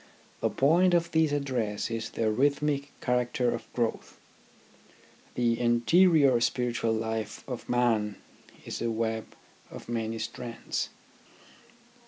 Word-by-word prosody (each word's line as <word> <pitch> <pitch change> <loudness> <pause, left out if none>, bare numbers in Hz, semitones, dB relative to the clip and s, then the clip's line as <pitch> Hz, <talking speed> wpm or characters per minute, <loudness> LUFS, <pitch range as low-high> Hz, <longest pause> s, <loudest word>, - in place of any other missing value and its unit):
The - - +1
point 175 +6 +4
of 170 -1 +1
this 160 -2 +3
address 125 -8 -1
is 115 -1 -3
the 110 -1 0
rhythmic 140 +3 +1
character 125 0 +1
of - - -6
growth. 115 -2 -2 1.2
The 120 -1 +1
interior 135 +3 +4
spiritual 120 -1 0
life 110 -1 -3
of 125 -3 -6
man 115 -4 +1 0.5
is - - -5
a 115 - 0
web 110 -1 -2 0.3
of - - -10
many 115 -1 -2
strands. 115 +1 -4
120 Hz, 115 wpm, -28 LUFS, 115-140 Hz, 1.2 s, point